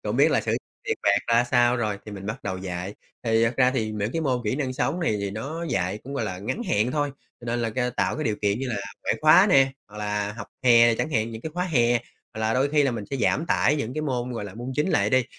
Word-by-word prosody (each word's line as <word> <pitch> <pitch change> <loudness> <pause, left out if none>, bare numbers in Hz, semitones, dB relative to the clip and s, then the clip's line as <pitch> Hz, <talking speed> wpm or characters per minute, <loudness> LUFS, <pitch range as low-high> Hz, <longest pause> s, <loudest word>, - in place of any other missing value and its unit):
Cũng - - -2
biết - - +5
là - - +3
sử - - -3
dụng - - +1 0.3
tiền - - -1
bạc 100 0 +4
ra 115 +1 +4
sao 120 0 +3
rồi, 105 -4 -1
thì 105 - -7
mình 100 -1 -8
bắt 105 +4 -5
đầu 95 -2 -3
dạy. 90 +1 -5 0.3
Thì 115 -1 +3
thật 115 - +1
ra 125 -1 +4
thì 115 -5 -1
những 105 +1 -3
cái 165 - -1
môn 130 -5 0
kỹ 105 +5 0
năng 135 -4 -2
sống 145 +5 -1
này 160 -11 +1
thì 100 -1 -2
nó 140 +11 -5
dạy 95 -2 -1
cũng, 140 +2 -6
gọi 135 - -1
là, 95 -4 -4
ngắn 110 - -3
hạn 110 - +1
thôi. 145 -1 0 0.3
Cho - - -12
nên 120 +1 -1
là, 115 - -1
ơ, 125 -1 +1
tạo - - +1
cái 155 - -3
điều 110 -3 0
kiện 100 +1 +1
như 135 0 -3
là 120 - -2 0.3
ngoại - - +1
khóa 155 +6 +7
nè, 135 -4 +5 0.2
hoặc 105 - -13
là 105 0 -2
học 105 -2 -8 0.2
hè 120 -1 +6
chẳng 155 - -2
hạn, 110 -4 0
những 110 0 -8
cái 160 - -4
khóa 180 0 0
hè. 120 -9 +2 0.4
Hoặc 110 - -5
là 110 +1 +1
đôi 135 +2 +2
khi 150 0 +3
là 135 - +2
mình 115 -3 -4
sẽ 135 - -1
giảm 135 +6 +1
tải 150 -3 +2
những 125 -3 -3
cái 155 - -2
môn, 125 -4 -2
gọi 115 -3 -4
là, 100 -2 -8
môn 120 +3 -6
chính 150 +5 +1
lại - - +2
đi, 130 -2 +3
120 Hz, 295 wpm, -25 LUFS, 105-135 Hz, 0.4 s, khóa